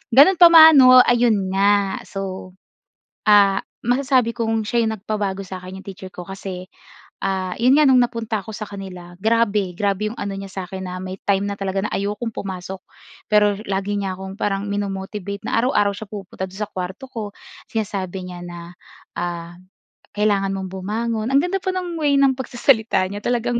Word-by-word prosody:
ganun 335 +7 +7
pa 345 - +10
man 320 -1 +10
'no, 255 -1 +9
ayun 225 -6 +2
nga 200 0 +2
so, 190 -1 -6 0.7
ah, 205 -2 +5 0.2
masasabi 250 -1 +1
kong 225 -2 -1
siya 235 -1 +1
'yung 220 - 0
nagpabago 200 -2 -3
sa'kin, 185 0 -8
yung - - -22
teacher 190 -1 -9
ko 180 - -7
kasi, 190 -1 -7 0.6
ah, 190 -2 -1
'yon 255 +3 +5
nga 305 - +5
no'ng 260 - +6
napunta 230 -3 -1
ako - - -11
sa 215 - -5
kanila, 185 -3 -9
grabe! 210 -4 +1
Grabe 205 +1 0
'yong 235 - -9
ano 200 -1 -3
niya 195 0 -7
sa 190 -1 -5
akin 190 -1 -6
na 180 - -5
may 185 0 -6
time 200 0 +1
na - - -2
talaga 195 +1 -2
na - - -4
ayokong 210 +3 -3
pumasok, 190 -1 -6 0.5
pero 210 -1 +4 0.2
lagi 195 +1 -1
niya 195 -1 -2
akong 190 0 -7
parang 200 0 -1
mino-motivate 200 0 -4
na 245 - -3
araw-araw 205 -5 +2
siya 215 0 -8
pumupunta 195 -2 -6
do'n 195 +3 -10
sa - - -25
kuwarto 185 +8 -5
ko. 220 -5 -5 0.4
Sinasabi 190 -4 -3
niya 175 -1 -8
na, 175 0 -9 0.4
ah, 170 -1 -4 0.6
"Kailangan 200 -2 +2
mong 190 -1 -5
bumangon." 220 +4 -2
Ang - - +6
ganda 385 +2 -1
pa 375 - -2
ng 360 -2 -3
way 285 -1 +3
ng 270 -1 +4
pagsasalita 235 -6 +1
niya 205 - -5
talagang 240 0 0
200 Hz, 180 wpm, -21 LUFS, 190-230 Hz, 0.7 s, pa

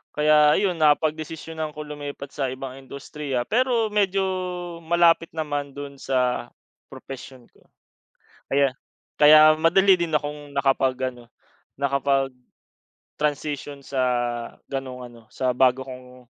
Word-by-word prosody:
Kaya 150 0 +5
ayun, 190 -4 0
napagdesisyonan 155 +1 0
ko 150 - -6
lumipat 145 -1 -7
sa 135 -3 -1
ibang 130 0 -7
industriya, 135 -1 -5
pero 235 -2 +1
medyo 195 -2 +2 0.6
malapit 170 0 +4
naman 145 -3 -3
dun 140 -1 -8
sa 125 -2 0 0.4
propesyon 130 -1 -10
ko. - - -27 0.9
Kaya 140 0 +4 0.5
kaya 150 +1 +8 0.2
madali 190 +4 +5
din 165 -2 -2
akong 145 -1 -3
nakapag-ano, 130 -3 0 1.7
nakapag-transition 145 -1 -4
sa 135 -2 -2 0.7
gano'ng 130 -2 -5
ano, 115 - -15
sa 130 -1 0
bago 130 0 +3
kong 125 -1 -12
145 Hz, 105 wpm, -24 LUFS, 130-155 Hz, 1.7 s, kaya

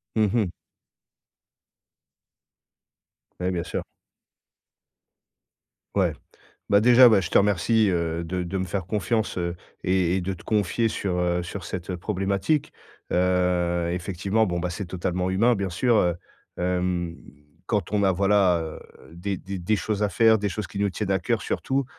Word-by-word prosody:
Mmh 110 -2 +3
mh. 115 -5 +2 2.9
Ouais, 90 +1 0
bien 85 -2 -2
sûr. - - -4 2.1
Ouais. - - +2 0.6
Bah 100 +1 +5
déjà 125 +1 +8
bah 105 - +5
je 90 -2 -3
te - - +4
remercie, 105 +2 +3
heu, 85 -2 -1
de 90 +2 -3
de 90 +2 -3
me - - 0
faire 90 0 -3
confiance, 105 +3 -1
heu, 85 0 -2 0.3
et 90 -1 +2
et - - -1
de 95 +2 -2
te 90 - -12
confier 110 +2 +1
sur, 95 -4 -2
heu, 90 0 +1
sur 90 +2 -6
cette 90 0 -4
problématique. 100 - -1 0.4
Heu, 90 -1 +1
effectivement, 95 +4 0
bon 85 -2 -2
bah, 90 - -2
c'est 100 +4 -5
totalement 90 +1 -2
humain 115 +6 +3
bien 100 -2 -2
sûr, 120 +7 +2
heu, 90 -4 +2 0.4
hem, 90 -1 -1 0.5
quand 105 -6 -1
on 105 -1 +1
a 95 - +4
voilà, 95 -2 +3
heu, 80 -1 -6 0.3
des 95 +3 -3
des 95 +2 -6
des 90 +5 0
choses 105 0 -2
à 105 - +1
faire, 110 +3 +4
des 105 0 -1
choses 105 0 -4
qui - - -9
nous 100 -1 +1
tiennent 100 +1 -3
à 95 - +3
cœur 110 +4 -1
surtout, 135 +5 -1
95 Hz, 160 wpm, -25 LUFS, 90-105 Hz, 2.9 s, déjà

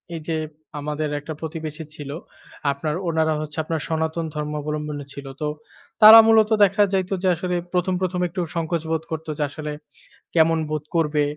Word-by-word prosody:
এই 160 - -5
যে, 165 - 0 0.4
আমাদের 150 +1 -2
একটা 150 +2 -6
প্রতিবেশী 160 0 -5
ছিল 145 -3 -8 0.6
আপনার 150 +2 -3
ওনারা 160 -1 +2
হচ্ছে 155 0 -6
আপনার 160 -1 -2
সনাতন 160 +1 -1
ধর্মাবলম্বী 150 0 -3 0.2
ছিল। 140 - -9 0.2
তো 150 - 0 0.5
তারা 220 +1 +12
মূলত 220 -1 +5
দেখা 195 +1 +3
যাইত 190 -1 0
যে, - - +2
আসলে 180 +2 -2 0.2
১ম, 180 +1 +1
১ম, 180 -1 -1
একটু 180 +2 -4
সংকোচ 165 0 -1
বোধ 160 0 0
করত 160 +1 -4
যে, 150 - 0
আসলে 150 +1 -6 0.6
কেমন 165 0 +4
বোধ 155 -1 -2
করবে 150 -2 +2
160 Hz, 165 wpm, -23 LUFS, 150-170 Hz, 0.6 s, তারা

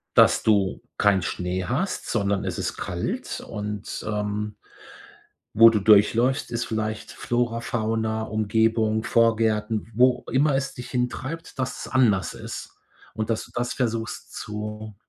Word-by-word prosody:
Dass - - +6
du 100 -3 +2 0.2
keinen 100 -2 +4
Schnee 90 +1 -2
hast, 155 - -2
sondern 100 -3 0
es - - -3
ist - - -3
kalt - - -3
und, 105 0 -5
ähm 105 0 -2 1.0
wo 115 +2 +9
du 110 -2 +1
durchläufst, 115 +6 +4
ist 115 0 -1
vielleicht 110 -1 -3
Flora, 120 -1 -1
Fauna, 110 -1 -1
Umgebung, 110 +1 +1
Vorgärten, 110 -1 +1
wo 125 +1 +4
immer 140 +2 +3
es 135 0 -1
dich 125 - -8
hintreibt 130 +6 -3
dass 130 -1 -3
es - - -11
anders 115 -8 +3
ist - - -8 0.4
und 110 0 -3
dass 110 - -1
du - - -19
das 120 0 -1
versuchst 115 -2 -3
zu 105 0 -6
110 Hz, 140 wpm, -25 LUFS, 105-120 Hz, 1.0 s, wo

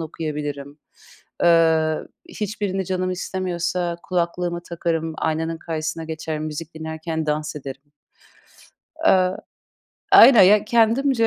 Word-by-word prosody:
okuyabilirim. 150 -2 -5 0.6
Eee, 160 -2 +4 0.3
hiçbirini 200 -2 -3
canım 185 0 -2
istemiyorsa 180 -1 -3
kulaklığımı 175 -1 -2
takarım, 165 -1 -2
aynanın 160 +1 -2
karşısına 160 0 -4
geçerim, 160 -1 -5
müzik 155 +1 -6
dinlerken 160 0 -5
dans 150 0 -2
ederim. 135 -1 -8 1.2
Eee 185 - +3 0.8
Aynen. 235 -3 +9
Ya, 205 +2 +5
kendimce, 230 +2 +2
165 Hz, 95 wpm, -22 LUFS, 155-185 Hz, 1.2 s, Aynen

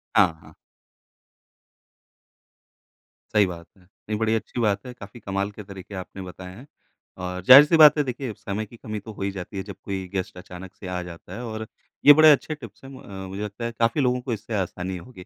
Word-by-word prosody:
हाँ, 90 - +5
हाँ। - - -16 2.8
सही 105 -1 +6
बात 85 -2 -7
है। 95 - -22
नहीं 105 +3 -7
बड़ी 110 0 +2
अच्छी 110 +2 -4
बात 100 -3 0
है 125 - -7
काफ़ी 110 -1 -12
कमाल 100 -1 -3
के 105 +1 -10
तरीके 100 0 -10
आपने 95 +1 -7
बताएँ 90 0 -9
हैं। 125 +7 -13 0.6
और 90 0 -4
जाहिर 135 +8 +10
सी 165 +2 +3
बात 150 -1 +8
है 150 - +3
देखिए 130 -2 -4
समय 105 +2 -4
की 120 - -15
कमी 110 -1 -6
तो 110 +2 -10
हो 100 - -11
ही 100 0 -1
जाती 95 +1 -7
है, 95 - -3
जब 100 0 -9
कोई 95 -2 -4
गेस्ट 95 -1 -3
अचानक 90 +1 -10
से 95 - -10
आ 90 0 -3
जाता 85 -1 -11
है 120 - -6
और 110 -1 -5 0.4
ये 145 - +11
बड़े 155 +1 +8
अच्छे 150 +2 +1
टिप्स 120 -6 -13
हैं, 135 - -10
मु 130 - -11 0.3
मुझे 95 +2 -6
लगता 105 +3 -5
है 115 - -2
काफ़ी 115 +5 +2
लोगों 125 -1 +2
को 125 -1 -3
इससे 110 +1 -6
आसानी 95 -1 -3
होगी। 90 0 -12
105 Hz, 215 wpm, -24 LUFS, 95-120 Hz, 2.8 s, ये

